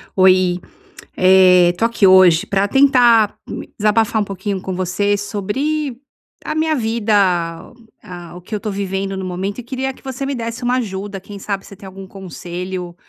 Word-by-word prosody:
Oi, 185 Hz, -1 st, +4 dB, 0.6 s
eh, 185 Hz, -1 st, +6 dB
estou 200 Hz, +6 st, 0 dB
aqui 230 Hz, -4 st, +2 dB
hoje 185 Hz, -3 st, +6 dB
para 195 Hz, 0 st, 0 dB
tentar 240 Hz, -5 st, +4 dB, 0.4 s
desabafar 220 Hz, +1 st, +2 dB
um -, -, -2 dB
pouquinho 195 Hz, 0 st, -4 dB
com 190 Hz, 0 st, -5 dB
você 185 Hz, +3 st, 0 dB
sobre 235 Hz, +8 st, -3 dB, 0.5 s
a -, -, -3 dB
minha 315 Hz, 0 st, +1 dB
vida, 225 Hz, -2 st, -1 dB, 0.9 s
ah, 175 Hz, -2 st, -10 dB
o -, -, -9 dB
que 180 Hz, +5 st, -8 dB
eu -, -, -1 dB
estou 210 Hz, +1 st, -4 dB
vivendo 195 Hz, 0 st, -3 dB
no 190 Hz, -, -5 dB
momento 185 Hz, +3 st, -4 dB
e -, -, -5 dB
queria 265 Hz, +2 st, -4 dB
que -, -, -20 dB
você 265 Hz, +1 st, -5 dB
me 280 Hz, -, -2 dB
desse 230 Hz, 0 st, -5 dB
uma 245 Hz, +1 st, +1 dB
ajuda. 200 Hz, -4 st, -4 dB
Quem 200 Hz, +2 st, -10 dB
sabe 195 Hz, 0 st, -4 dB
se -, -, -12 dB
tem 195 Hz, -, -13 dB
algum 190 Hz, 0 st, -10 dB
conselho, 180 Hz, -1 st, -7 dB
200 Hz, 175 wpm, -18 LUFS, 185-230 Hz, 0.9 s, eh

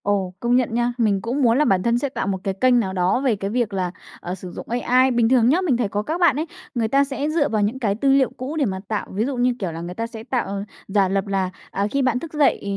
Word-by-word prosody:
Ồ, 195 Hz, -3 st, 0 dB
công 240 Hz, +2 st, +1 dB
nhận 250 Hz, -3 st, +1 dB
nha, 240 Hz, +1 st, +1 dB
mình 210 Hz, -5 st, +2 dB
cũng 245 Hz, +6 st, -2 dB
muốn 235 Hz, -2 st, +4 dB
là 300 Hz, -, +3 dB
bản 185 Hz, -6 st, +2 dB
thân 235 Hz, 0 st, +2 dB
sẽ 280 Hz, +3 st, -1 dB
tạo 255 Hz, -, -3 dB
một 195 Hz, -1 st, 0 dB
cái 195 Hz, -, -1 dB
kênh 245 Hz, +5 st, +3 dB
nào 190 Hz, -5 st, -2 dB
đó 185 Hz, +6 st, +1 dB
về 260 Hz, -5 st, +2 dB
cái 195 Hz, 0 st, -4 dB
việc 235 Hz, -2 st, -1 dB
là, 185 Hz, -2 st, -1 dB, 0.3 s
à, 180 Hz, +1 st, -4 dB
sử 185 Hz, -1 st, -9 dB
dụng -, -, -9 dB
AI. 250 Hz, +2 st, +3 dB
Bình 235 Hz, -2 st, +2 dB
thường 245 Hz, -2 st, +4 dB
nhớ, 335 Hz, +7 st, +3 dB
mình 300 Hz, -10 st, +1 dB
thấy 235 Hz, -4 st, 0 dB
có 205 Hz, +1 st, -1 dB
các 315 Hz, +9 st, -2 dB
bạn 340 Hz, -7 st, +4 dB
ấy, 310 Hz, +3 st, -1 dB, 0.3 s
người 230 Hz, -2 st, +1 dB
ta 275 Hz, +5 st, +3 dB
sẽ 280 Hz, +1 st, -3 dB
dựa 310 Hz, -2 st, +1 dB
vào 215 Hz, -2 st, 0 dB
những 215 Hz, +6 st, 0 dB
cái 205 Hz, -5 st, 0 dB
tư 270 Hz, +6 st, +1 dB
liệu 270 Hz, -1 st, +4 dB
cũ 265 Hz, +5 st, -5 dB
để 285 Hz, -, +2 dB
mà 190 Hz, -4 st, -2 dB
tạo, 215 Hz, -2 st, -2 dB
ví 210 Hz, +4 st, 0 dB
dụ 270 Hz, -1 st, -3 dB
như 245 Hz, +1 st, +2 dB
kiểu 185 Hz, -4 st, -2 dB
là 165 Hz, +1 st, -6 dB
người 175 Hz, +1 st, -6 dB
ta 230 Hz, +3 st, -3 dB
sẽ 225 Hz, -1 st, -9 dB
tạo 215 Hz, -5 st, -2 dB, 0.2 s
giả 195 Hz, -1 st, +2 dB
lập 195 Hz, +1 st, -1 dB
là, 195 Hz, -2 st, 0 dB, 0.2 s
à, 200 Hz, +1 st, 0 dB
khi 275 Hz, -, +1 dB
bạn 255 Hz, -2 st, +1 dB
thức 325 Hz, +1 st, -9 dB
dậy 300 Hz, -2 st, +2 dB
235 Hz, 300 wpm, -22 LUFS, 195-260 Hz, 0.3 s, muốn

